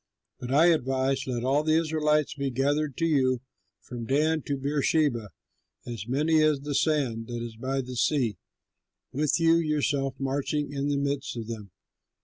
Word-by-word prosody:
But 125 0 -6
I 150 +5 +5
advise, 135 -2 0
let 120 -2 -2
all 135 +3 +2
the 155 +1 +2
Israelites 155 -2 +1
be 140 -1 -2
gathered 140 +2 0
to 165 - +1
you, 130 -6 +2 0.4
from 120 -2 -7
Dan 155 +3 +2
to 140 - -1
Beersheba, 140 -4 +1 0.6
as 115 -3 -6
many 155 +5 +2
as 155 -3 +2
the 145 0 -4
sand 135 -8 0
that 120 -1 -4
is 115 -1 -7
by 130 +4 -2
the 125 0 -7
sea, 120 - +1 0.7
with 150 +4 +1
you 165 0 +5
yourself 145 -4 0
marching 140 +2 -2
in 140 0 -1
the 145 -1 0
midst 140 -1 -2
of 115 - -4
them. 110 -3 -7
140 Hz, 165 wpm, -27 LUFS, 125-150 Hz, 0.7 s, I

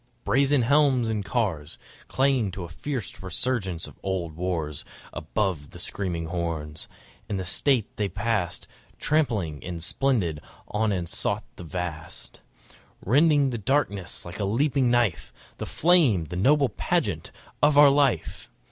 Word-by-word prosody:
Brazen 140 0 +3
helms 135 -2 +3
and 105 -2 -1
cars 95 - -2 0.3
Clanged 130 -7 +1
to 95 - -5
a 85 - -7
fierce 125 - -5
resurgence 95 -2 -1
of 75 - -13
old 90 -4 -2
wars 80 -4 -3 0.3
Above 80 -3 -2
the - - -11
screaming 85 -4 -3
horns. 80 -3 -4 0.4
In 105 - -1
state 110 +5 +1
they 105 -2 0
passed, 100 -3 -2 0.3
Trampling 105 - 0
and 85 -1 -5
splendid 95 - +1 0.3
on 110 0 +1
and 90 -3 -2
sought 100 +3 -1
the - - -9
vast 80 -7 -6 0.6
Rending 145 - +4
the 120 - -3
darkness 100 - -1
like 85 +3 -8
a - - 0
leaping 130 +5 +2
knife, 120 -5 +1 0.3
The - - -5
flame, 150 - +3
the 90 - -7
noble 140 +8 +3
pageant 105 - -1 0.3
of 145 0 +4
our 145 -1 +9
life! 140 -3 +1
100 Hz, 140 wpm, -26 LUFS, 85-135 Hz, 0.6 s, our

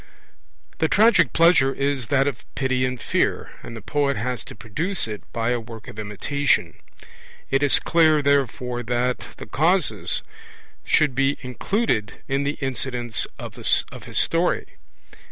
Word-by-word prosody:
The 160 - +3
tragic 190 - +4
pleasure 165 -5 +5
is 140 -4 -1
that 135 -1 +2
of 145 - -3
pity 130 -1 +1
and 130 -1 -3
fear, - - -1
and 115 - -8
the 110 - -10
poet 140 -1 0
has 125 +2 -3
to - - -10
produce 155 - -3
it 105 -2 -6
by 115 +1 -1
a 120 - 0
work 115 -1 -10
of 105 - -9
imitation; 110 +8 0 0.8
it 135 +1 +2
is 145 -1 +4
clear, 160 -3 +3
therefore, 130 -3 +1
that 120 +1 0 0.2
the - - -8
causes 175 +5 +1 0.6
should 150 -4 +3
be 135 +2 +1
included 125 - -1
in 135 +1 0
the 145 - -2
incidents 125 -3 -2
of - - -8
his - - 0
story. - - +2
135 Hz, 145 wpm, -23 LUFS, 120-145 Hz, 0.8 s, pleasure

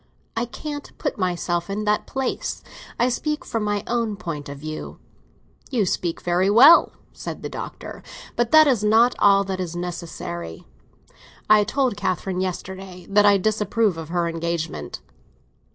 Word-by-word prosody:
I 230 +1 0
can't 290 +4 -7
put - - -3
myself 175 -1 -1
in 205 +2 -2
that 210 0 0
place. 265 -1 -3 0.4
I 240 - +4
speak 300 +4 -2
from 225 -2 -2
my 205 -1 -1
own 230 -3 -1
point 160 -8 -6
of 140 - -7
view." 155 +2 -7 0.7
"You 235 -7 +1
speak 175 -1 -2
very 180 +2 +1
well," 260 +10 +7 0.2
said - - -7
the - - -4
Doctor; - - -7 0.3
"but 240 -1 +1
that 310 +2 +8
is 250 -7 +2
not 225 +3 +5
all 200 -1 +5
that 190 -1 -4
is 175 -2 -4
necessary. 165 - -6 0.9
I 215 -1 +7
told 255 0 0
Catherine 185 -1 -2
yesterday 185 0 -5
that 205 +1 +5
I 200 -1 +6
disapproved 210 -1 0
of 160 -1 -7
her 175 0 0
engagement." 165 - -4
195 Hz, 150 wpm, -23 LUFS, 175-225 Hz, 0.9 s, that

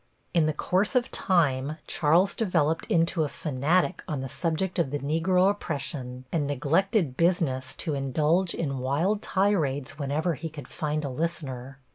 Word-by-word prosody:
In 165 -3 +3
the - - +2
course 185 - 0
of 250 -1 +2
time 150 -5 +1
Charles 170 +5 +3
developed 165 -7 +1
into 165 0 +2
a - - 0
fanatic 155 +7 0
on 150 -5 -2
the 135 - -4
subject 170 +6 -1
of 165 - +1
the 145 - -1
Negro 165 +6 +2
oppression 135 -8 -5
and 150 -4 0
neglected 155 - +1
business 135 -6 +1
to 155 -1 -2
indulge 155 +6 +1
in 140 -5 -2
wild 160 +11 0
tirades 155 -10 0
whenever 150 +5 0
he 160 +2 -5
could 145 -5 -9
find 150 0 -2
a - - -2
listener. 135 -3 -4
155 Hz, 155 wpm, -27 LUFS, 140-175 Hz, -, In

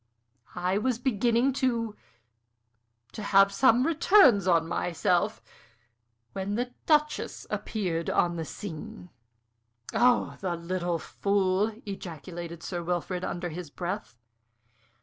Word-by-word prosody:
I 180 +2 0
was 250 +1 0
beginning 240 +1 +2
to 230 -4 0 1.2
to 215 - -7
have 200 -1 +5
some 250 +1 +4
returns 305 - +5
on 165 -2 +3
myself, 180 +5 0 0.9
when 195 +1 -3
the 245 +2 -2
Duchess 300 -1 +1
appeared 175 -6 -2
on 175 0 +2
the 165 - -3
scene." 180 +3 -8 0.8
"Oh, 245 0 +3
the 180 -3 -1
little 175 0 -2
fool!" 200 +3 0
ejaculated 170 -3 -7
Sir 175 -2 -4
Wilfrid, 180 +1 -2
under 175 0 -3
his 170 0 -7
breath. 180 - -5
195 Hz, 110 wpm, -28 LUFS, 175-230 Hz, 1.2 s, have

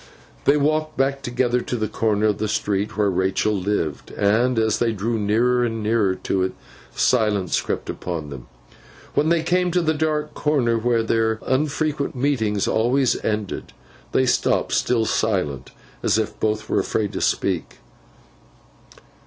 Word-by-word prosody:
They 140 +2 +5
walked 155 +1 0
back 135 +1 +1
together 125 -1 0
to 125 - -3
the 110 -2 -1
corner 110 0 0
of 105 -2 +1
the 110 - -1
street 105 0 -1
where 105 -2 +2
Rachael 95 +3 +1
lived, 95 -7 -2
and 115 +5 +1
as 110 -1 +2
they 115 -1 +1
drew 110 +3 -2
nearer 120 +4 +2
and 115 -2 -2
nearer 105 -3 +2
to 95 - -1
it, 95 - 0 0.4
silence 105 -6 +2
crept - - -3
upon 80 -5 -5
them. 65 -3 -9 0.7
When 150 +2 +2
they 165 -1 +2
came 180 +1 +1
to 180 +1 +1
the 160 -1 +2
dark 150 -1 -1
corner 135 -6 +1
where 115 0 +1
their 110 0 +1
unfrequent 145 +1 0
meetings 115 -7 0
always 125 +3 +1
ended, 105 -2 -3 0.4
they 130 - +3
stopped, 125 - +1
still 115 -2 +2
silent, 90 - -1 0.3
as - - +2
if 110 -1 -2
both 110 0 -1
were - - +1
afraid 105 -3 -1
to - - -3
speak. - - -1
115 Hz, 155 wpm, -22 LUFS, 105-135 Hz, 0.7 s, They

